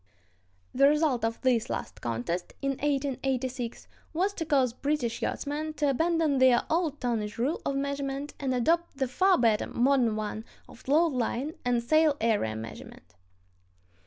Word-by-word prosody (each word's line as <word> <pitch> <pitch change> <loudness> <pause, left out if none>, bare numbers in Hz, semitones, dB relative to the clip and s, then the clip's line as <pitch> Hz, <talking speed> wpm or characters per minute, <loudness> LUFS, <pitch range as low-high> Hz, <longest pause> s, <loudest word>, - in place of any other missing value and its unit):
The 275 +2 +5
result 295 -5 +2
of 225 0 -1
this 255 -1 +1
last - - -5
contest 120 +10 -3
(1886) 270 -3 -2 0.3
was 380 +5 0
to 325 -5 -4
cause 265 -5 +2
British 270 -3 -2
yachtsmen 305 +2 -3
to 290 -2 +1
abandon 320 -1 +1
their 255 -2 +5
old 320 -3 0
tonnage 225 -4 -2
rule 265 +8 -1
of 275 - -1
measurement 280 0 -3
and 270 -2 -1
adopt 330 +5 +1
the 265 -1 0
far 370 +9 +3
better 225 -4 +2
modern 245 -3 +2
one 215 0 -4 0.2
of 255 - -16
load 310 +3 +3
line 255 +4 -2
and 245 -1 +1
sail 310 +2 +3
area 210 - +1
measurement. 110 -5 -10
270 Hz, 145 wpm, -28 LUFS, 235-295 Hz, 0.3 s, The